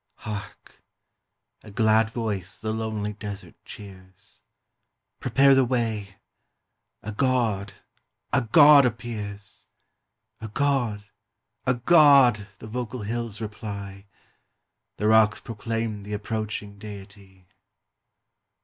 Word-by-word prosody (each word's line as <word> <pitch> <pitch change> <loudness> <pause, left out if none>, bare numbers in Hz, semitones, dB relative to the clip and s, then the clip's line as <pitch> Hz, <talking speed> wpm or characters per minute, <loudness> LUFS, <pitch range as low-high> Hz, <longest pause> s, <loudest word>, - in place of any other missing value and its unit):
Hark! 105 -1 -9 0.8
a 110 - -12
glad 110 +1 +3
voice 105 -6 -4
the 110 0 -3
lonely 110 -2 -3
desert 100 -4 -8
cheers: 95 -2 -12 0.8
Prepare 135 +3 +4
the 135 0 +5
way! 115 -6 -2 0.9
a 110 - -5
God, 110 -5 0 0.6
a 135 - +4
God 145 +4 +7
appears! 105 -4 -5 0.7
A 110 - -6
God, 120 -3 0 0.6
a 125 - +3
God! 130 -6 +5
the - - -11
vocal 120 +1 -5
hills 115 0 -4
reply, 100 -2 -7 0.9
The 105 - 0
rocks 110 -1 +4
proclaim 115 -1 -4
th' 105 +1 -7
approaching 105 -1 -5
Deity. 100 -2 -12
110 Hz, 95 wpm, -25 LUFS, 100-120 Hz, 0.9 s, God